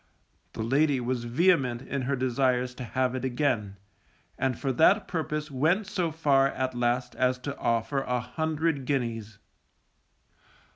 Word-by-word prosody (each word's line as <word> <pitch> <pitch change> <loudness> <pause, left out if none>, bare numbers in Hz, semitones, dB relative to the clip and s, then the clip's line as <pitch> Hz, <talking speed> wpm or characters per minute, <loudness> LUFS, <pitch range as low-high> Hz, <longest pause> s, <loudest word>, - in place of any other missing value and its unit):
The - - -4
lady 140 +3 +2
was 120 -1 -2
vehement 130 -2 +2
in 140 - -3
her 135 +2 0
desires 125 -1 0
to 125 - -7
have 130 +1 -1
it 130 -1 -4
again, 120 -6 -1 0.6
and 130 -2 -1
for 135 - -1
that 195 - +4
purpose 150 -3 -3
went 160 +10 +1
so 180 -4 -1
far 140 -4 +3
at 130 -1 -2
last 120 +1 0
as 125 0 +2
to 140 +3 -5
offer 115 +4 0
an 125 -1 -1
hundred 160 +1 -1
guineas. 115 -6 -2
130 Hz, 145 wpm, -27 LUFS, 125-150 Hz, 0.6 s, that